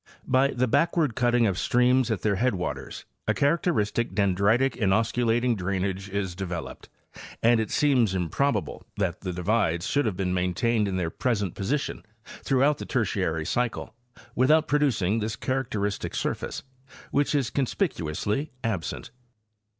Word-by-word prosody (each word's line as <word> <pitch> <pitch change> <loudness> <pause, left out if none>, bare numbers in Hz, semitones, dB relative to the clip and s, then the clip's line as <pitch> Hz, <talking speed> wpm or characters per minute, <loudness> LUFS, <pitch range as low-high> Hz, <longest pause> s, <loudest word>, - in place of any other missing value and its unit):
By 130 +1 +3
the 130 -2 0
backward 160 0 +2
cutting 120 -1 +2
of 95 -3 0
streams 125 0 +3
at 110 - -2
their 100 -3 +1
headwaters 90 - -2 0.2
a - - +2
characteristic 140 - +1
dendritic, 100 +6 +3
inosculating 115 +3 +1
drain 95 -1 -1
age 95 +1 -4
is 95 -2 -2
developed, 90 -2 -6 0.5
and 115 0 +5
it 110 - -1
seems 125 -9 +2
improbable 95 - -1
that 95 -4 -1
the 95 - -3
divides 90 -2 0
should 145 -1 +1
have 100 -5 -2
been 90 -2 -1
maintained 100 +5 +1
in 95 -1 -2
their 85 -3 -1
present 105 -6 -1
position 140 +9 -2 0.2
throughout 140 +2 +1
the - - -5
Tertiary 90 - -1
cycle 120 +5 -2 0.4
without 155 +5 +3
producing 115 -9 +1
this 110 +1 -2
characteristic 110 -5 -2
surface, - - -3 0.5
which 145 +1 +1
is 135 -5 0
conspicuously 130 - -1
absent. 100 -9 -3
110 Hz, 135 wpm, -26 LUFS, 95-130 Hz, 0.5 s, and